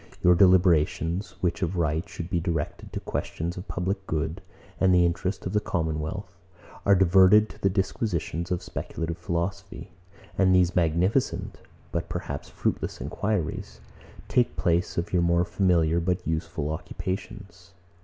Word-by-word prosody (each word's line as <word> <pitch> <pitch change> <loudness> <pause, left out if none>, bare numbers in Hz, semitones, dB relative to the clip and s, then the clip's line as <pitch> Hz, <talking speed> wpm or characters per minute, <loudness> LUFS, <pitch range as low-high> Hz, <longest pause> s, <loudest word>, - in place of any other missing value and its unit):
Your 90 - +7
deliberations, 90 -1 +3
which 85 -2 0
of 90 0 -1
right 80 0 0
should 85 - -6
be 85 - 0
directed 85 -3 -3
to - - -3
questions 85 +2 -4
of 90 - -8
public 95 +3 -3
good, 80 +1 -2 0.4
and 95 -1 +4
the 90 -1 +5
interest 95 +3 -2
of 95 - -3
the 105 - +3
commonwealth, 80 +2 -3 0.6
are 100 - +7
diverted 95 +3 +6
to - - -14
the 95 - +3
disquisitions 90 -3 -2
of 90 -1 -2
speculative 85 0 -5
philosophy; 95 +2 -4 0.5
and 95 -1 +5
these 90 -1 +3
magnificent, 90 - +1 0.3
but - - -3
perhaps - - -5
fruitless - - -2
enquiries, 100 -7 -3 0.5
take 125 -1 +2
place 85 -1 +1
of 85 - -2
your 90 - +3
more 85 0 +3
familiar 85 -2 +2
but 90 +1 -1
more 80 - 0
useful 80 -2 -3
occupations. 95 +2 -6
90 Hz, 145 wpm, -26 LUFS, 85-95 Hz, 0.6 s, Your